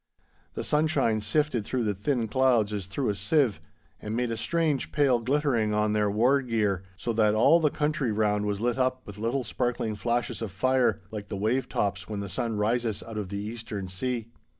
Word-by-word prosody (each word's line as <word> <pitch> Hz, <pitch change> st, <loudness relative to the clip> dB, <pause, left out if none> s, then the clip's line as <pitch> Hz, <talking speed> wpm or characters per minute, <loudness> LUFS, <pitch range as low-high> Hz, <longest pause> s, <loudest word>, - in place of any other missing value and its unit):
The -, -, -3 dB
sunshine 150 Hz, -8 st, +1 dB
sifted 120 Hz, +2 st, 0 dB
through 125 Hz, +3 st, -1 dB
the 105 Hz, -2 st, 0 dB
thin 115 Hz, +4 st, -1 dB
clouds 120 Hz, -3 st, +2 dB
as 100 Hz, -3 st, -3 dB
through 125 Hz, +6 st, -2 dB
a 100 Hz, -, 0 dB
sieve, 110 Hz, -, +1 dB, 0.4 s
and 105 Hz, +1 st, -4 dB
made 120 Hz, 0 st, 0 dB
a -, -, -1 dB
strange 150 Hz, +4 st, 0 dB
pale 140 Hz, -5 st, +3 dB
glittering 120 Hz, -4 st, +1 dB
on 105 Hz, 0 st, +1 dB
their 105 Hz, -1 st, +2 dB
war 125 Hz, +7 st, +3 dB
gear, 110 Hz, -7 st, 0 dB, 0.2 s
so 115 Hz, +6 st, -2 dB
that 110 Hz, -1 st, +3 dB
all 130 Hz, +10 st, +6 dB
the 155 Hz, -2 st, +3 dB
country 150 Hz, -5 st, 0 dB
round 105 Hz, -1 st, +1 dB
was 100 Hz, -1 st, -1 dB
lit 120 Hz, +3 st, 0 dB
up 130 Hz, 0 st, 0 dB
with 105 Hz, 0 st, -10 dB
little 120 Hz, +4 st, -1 dB
sparkling 115 Hz, -1 st, -2 dB
flashes 120 Hz, +2 st, -1 dB
of 110 Hz, -4 st, -4 dB
fire, 130 Hz, +1 st, +2 dB
like 105 Hz, -2 st, -6 dB
the 100 Hz, -, -4 dB
wave 115 Hz, +6 st, 0 dB
tops 100 Hz, 0 st, -2 dB
when 105 Hz, -2 st, -3 dB
the 100 Hz, -1 st, -5 dB
sun 110 Hz, +4 st, -2 dB
rises 115 Hz, +1 st, 0 dB
out 110 Hz, -2 st, -6 dB
of 100 Hz, -3 st, -5 dB
the 100 Hz, -, -4 dB
eastern 105 Hz, -2 st, -5 dB
sea. 115 Hz, +4 st, -3 dB
115 Hz, 200 wpm, -27 LUFS, 105-130 Hz, 0.4 s, all